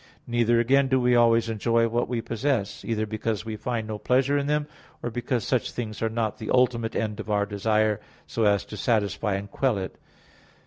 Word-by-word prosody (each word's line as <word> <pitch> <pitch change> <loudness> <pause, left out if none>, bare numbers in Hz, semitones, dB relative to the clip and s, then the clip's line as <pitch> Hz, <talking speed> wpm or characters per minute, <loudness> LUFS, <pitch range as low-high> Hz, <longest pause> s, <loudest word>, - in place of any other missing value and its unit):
Neither, 120 -1 +2
again, 135 +3 +3
do 130 0 +2
we 125 0 +3
always 115 -1 +4
enjoy 115 +1 +2
what 120 +1 0
we 120 -1 -2
possess; 115 -4 -1
either 110 -2 -1
because 110 0 -3
we 110 -1 -4
find 115 0 -3
no 110 -1 -4
pleasure 130 +4 +2
in 140 0 0
them, 150 0 +1 0.4
or 120 - -2
because 120 0 -1
such 125 +2 0
things 110 -3 -5
are 115 - +1
not 110 -1 -2
the 110 - -6
ultimate 120 -3 +2
end 105 -2 -2
of - - -6
our 105 -1 +2
desire, 105 +1 +1 0.2
so 115 - -1
as 100 -1 +3
to 105 - -8
satisfy 105 -1 0
and 100 +1 -5
quell 130 -6 +1
it. 95 -1 -6
115 Hz, 205 wpm, -26 LUFS, 110-120 Hz, 0.4 s, always